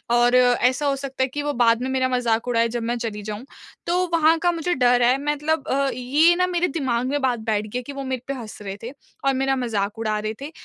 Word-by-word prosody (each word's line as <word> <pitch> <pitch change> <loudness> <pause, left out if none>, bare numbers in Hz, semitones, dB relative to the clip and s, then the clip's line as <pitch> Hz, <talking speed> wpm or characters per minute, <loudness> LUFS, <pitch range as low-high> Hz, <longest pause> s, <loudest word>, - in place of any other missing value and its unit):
और 240 +1 +4
ऐसा 250 +2 +3
हो 280 -1 +2
सकता 270 -1 -3
है - - +1
कि 290 +3 -4
वो 290 0 -1
बाद 230 0 +4
में 260 - -2
मेरा 260 -1 +1
मज़ाक 240 -2 0
उड़ाए 230 -1 +2
जब 235 - -2
मैं 235 +1 -1
चली 225 -3 -4
जाऊँ 210 +4 -6 0.4
तो 345 - +1 0.2
वहाँ 325 0 +4
का 350 - +4
मुझे 345 +1 -1
डर 245 -4 +3
है। 250 +2 +4
मतलब 295 +1 -1
अ, 275 +1 +1
ये 290 +8 +3
ना 365 +1 +1
मेरे 355 0 0
दिमाग 260 -6 -1
में 285 +2 -1
बात 250 -3 +1
बैठ 215 -1 -1
गई 215 - -5
है - - -8
कि 280 - -8
वो 275 0 -5
मेरे 260 -2 -3
पे 275 - -2
हँस 235 -5 -8
रहे 195 -1 -6
थे 235 - -5 0.3
और 275 - +3
मेरा 270 +1 +1
मज़ाक 225 -4 -2
उड़ा 215 -1 -1
रहे 215 +1 -3
थे 290 +3 -6
255 Hz, 260 wpm, -23 LUFS, 235-285 Hz, 0.4 s, और